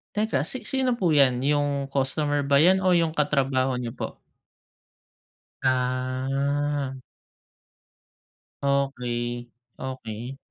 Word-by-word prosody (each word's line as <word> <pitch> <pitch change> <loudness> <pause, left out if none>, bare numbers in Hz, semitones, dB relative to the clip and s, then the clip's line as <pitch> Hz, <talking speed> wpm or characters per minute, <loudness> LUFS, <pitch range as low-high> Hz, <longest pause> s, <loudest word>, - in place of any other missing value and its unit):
Teka, 210 -11 +1
si 245 - -3
sino 260 -3 0
po 175 -7 +2
'yan, 135 -4 +5
yung 145 -1 +1
customer 145 +2 +1
ba 140 0 +3
'yan 185 +5 +5
o 185 - +2
yung 165 -2 +1
katrabaho 135 -3 +1
niyo 120 -2 -4
po? - - -6 1.5
Ah. 130 +2 0 1.6
Okey. 120 -3 -1 0.3
Okey. 130 -1 -6
140 Hz, 95 wpm, -25 LUFS, 130-145 Hz, 1.6 s, yan